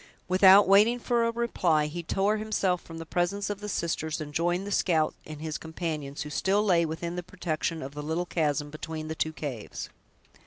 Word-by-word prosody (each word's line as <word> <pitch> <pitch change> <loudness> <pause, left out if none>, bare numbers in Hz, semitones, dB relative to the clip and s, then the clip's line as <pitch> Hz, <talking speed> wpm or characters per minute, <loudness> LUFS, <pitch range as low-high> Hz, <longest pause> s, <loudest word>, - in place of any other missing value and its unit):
Without 190 +2 +7
waiting 210 +5 +6
for 235 -1 +1
a - - 0
reply, 185 -10 +1
he 160 +3 -4
tore 195 +5 +1
himself 200 -4 0
from 165 - -10
the 165 - -6
presence 195 +5 -1
of 205 - -5
the 210 0 -6
sisters, 160 -4 -2
and 150 -1 -6
joined 175 +4 0
the 205 - -5
scout 160 -6 +2
and 155 -1 -8
his 155 -1 -3
companions, 155 -4 -4
who 150 - -8
still 195 +6 +2
lay 170 -4 +3
within 170 +2 -4
the - - -1
protection 165 -3 -3
of 135 +1 -7
the 150 - -5
little 160 +4 -2
chasm 150 -3 -1
between 155 0 -6
the - - -2
two 160 - -1
caves. 140 -8 -6
170 Hz, 200 wpm, -28 LUFS, 155-195 Hz, -, Without